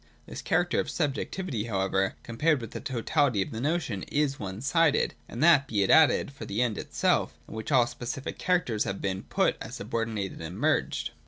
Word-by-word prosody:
This - - -7
character 175 0 +1
of - - -1
subjectivity, 145 - -2
however, 95 -2 0
compared 145 +6 +1
with 115 - -8
the - - -5
totality 130 -1 +1
of - - -10
the 110 - -5
notion, 145 - -1
is 145 -2 0
one 95 -1 -5
sided, 160 +2 +2 0.2
and 120 +6 -3
that, 150 -5 +6
be 105 -3 +1
it 95 - +2
added, 160 -3 +5
for 135 - -9
the 100 +2 -3
End 115 -4 -1
itself, - - 0
in - - -10
which 110 +7 -5
all 125 -4 +5
specific 125 +3 -6
characters 175 -13 +1
have 100 0 -3
been 95 -1 -2
put - - 0
as - - -6
subordinated 110 -6 -3
and 80 +3 -6
merged. - - 0
120 Hz, 190 wpm, -28 LUFS, 105-150 Hz, 0.2 s, that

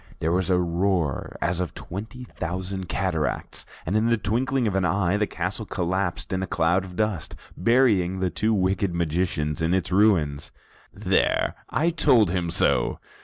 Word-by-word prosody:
There 80 - -1
was 95 +1 0
a 90 - +4
roar 85 -3 -1
as 90 +1 0
of 90 -2 -3
twenty 110 +7 -7
thousand 95 -3 -5
cataracts, 85 -5 -2 0.2
and 90 - -1
in 110 +2 +3
the 115 - +3
twinkling 125 +5 0
of 105 - 0
an 95 -1 +1
eye, 95 0 +1
the 105 0 +1
castle 95 +5 -3
collapsed 95 +1 -2
in 95 - -1
a 95 - -2
cloud 85 +3 +1
of 90 -1 -10
dust, 105 -5 -2 0.2
burying 100 -5 +3
the 95 -1 -1
two 110 +1 0
wicked 95 -2 +1
magicians 80 -3 -1
in 80 +3 +2
its 95 -1 -1
ruins. 85 -8 +2 0.4
"There, - - +1 0.2
I 165 +5 +1
told 130 - +4
him 90 -2 -1
so!" 85 - +2
95 Hz, 170 wpm, -25 LUFS, 85-105 Hz, 0.4 s, a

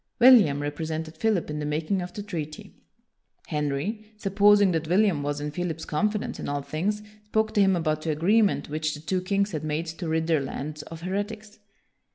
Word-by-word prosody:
William 215 - +6
represented 160 +2 -4
Philip 210 -8 0
in 150 - -3
the 150 - -3
making 160 +6 -1
of 180 0 -6
the 205 - -6
treaty. 155 -7 -6 0.7
Henry, 150 +9 -2
supposing 205 -1 +4
that 160 -2 -1
William 185 -3 +3
was 145 0 -2
in 150 0 -3
Philip's 165 0 -3
confidence 210 +6 -1
in - - -4
all 145 0 -2
things, 185 +9 -2 0.2
spoke 220 +1 0
to 210 - +4
him 195 -1 +4
about 155 -2 0
the 160 - -3
agreement 195 +8 +2
which 155 +1 -2
the - - -9
two 185 +4 -1
kings 200 +2 0
had 155 -3 -4
made 155 +2 -1
to 165 +1 -6
rid 160 0 +1
their 160 -3 +2
lands 150 +2 -5
of 165 +1 -10
heretics. 205 +4 -4
165 Hz, 190 wpm, -26 LUFS, 155-205 Hz, 0.7 s, William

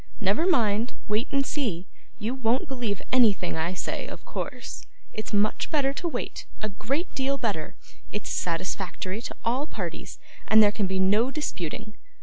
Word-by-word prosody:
Never 210 - +3
mind; 230 - +3
wait 215 +4 +1
and 275 0 +2
see. 210 - -1 0.3
You 220 +3 -1
won't 260 +5 +1
believe 245 -7 -2
anything 220 -8 +4
I 165 +3 0
say, - - -3
of - - -8
course. - - -5 0.3
It's 215 - -4
much 210 0 +2
better 275 -3 +2
to 340 - -2
wait; 330 - -3
a 215 - -2
great 270 - -2
deal 275 +1 +1
better; 200 - -1 0.4
it's 210 - -3
satisfactory 185 +3 -2
to - - -5
all 255 +6 +1
parties, - - -5 0.3
and 220 0 +8
there 205 - +6
can 210 -2 0
be 190 0 0
no 205 +6 +4
disputing. 215 - -3
220 Hz, 160 wpm, -27 LUFS, 200-265 Hz, 0.4 s, and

